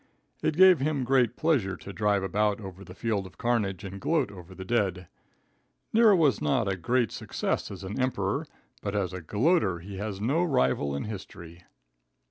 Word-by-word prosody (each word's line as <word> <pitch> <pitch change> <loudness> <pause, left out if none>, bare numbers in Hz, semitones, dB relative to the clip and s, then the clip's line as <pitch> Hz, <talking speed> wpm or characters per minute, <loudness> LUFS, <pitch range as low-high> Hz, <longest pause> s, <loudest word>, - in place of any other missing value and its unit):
It 155 - 0
gave 185 -2 +8
him 140 -1 0
great 125 -1 +2
pleasure 130 - +1
to 100 - -9
drive 105 -2 +1
about 105 +2 +1
over 95 -2 -9
the 90 -1 -12
field 105 -4 -1
of 80 -4 -18
carnage 105 -6 0
and 100 0 -7
gloat 165 - +1
over 95 -1 -12
the 95 - -8
dead. 95 -5 0 0.9
Nero 220 -2 +6
was 155 -6 +3
not 120 -6 +1
a 95 - 0
great 120 +5 0
success - - -2
as - - -8
an 100 +6 -3
Emperor, 130 +3 -1 0.3
but 100 0 -3
as 95 -3 -1
a 90 - -5
gloater 105 - +2
he 95 +3 -9
has 100 -1 -4
no 135 +11 +1
rival 70 - +1
in 70 - -3
history. 90 -4 -9
105 Hz, 180 wpm, -28 LUFS, 95-130 Hz, 0.9 s, gave